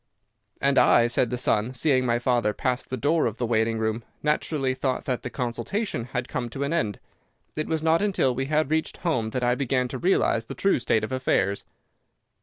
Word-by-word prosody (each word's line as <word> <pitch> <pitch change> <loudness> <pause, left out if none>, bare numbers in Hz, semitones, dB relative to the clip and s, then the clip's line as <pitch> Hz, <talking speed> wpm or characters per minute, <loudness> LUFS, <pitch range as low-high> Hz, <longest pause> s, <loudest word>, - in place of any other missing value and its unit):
"'And 140 0 +3
I,' 120 - +5
said 120 0 +2
the 125 - -2
son, 120 0 +1
'seeing 130 -1 +2
my 120 0 +2
father 120 -3 +1
pass 125 -1 -1
the 130 - -5
door 150 +5 +2
of 115 0 -5
the 120 - -1
waiting 115 0 +1
room, 110 +1 -1 0.2
naturally 150 -3 0
thought 130 0 -2
that 125 -2 -1
the 125 - -5
consultation 125 - -3
had 125 0 -4
come 120 -2 -3
to 135 +4 -4
an 140 +3 -1
end. 110 - -1 0.6
It 155 - -2
was 160 -1 -1
not 165 +2 +3
until 190 -11 +1
we 135 +2 -2
had 155 +1 0
reached 160 0 -1
home 120 -10 +1
that 125 +2 -3
I 125 0 +3
began 130 -1 0
to 130 - -5
realize 115 -10 +1
the - - -6
true 195 -7 +2
state 110 -2 +1
of 110 - -4
affairs. 100 -6 0
130 Hz, 210 wpm, -25 LUFS, 120-145 Hz, 0.6 s, I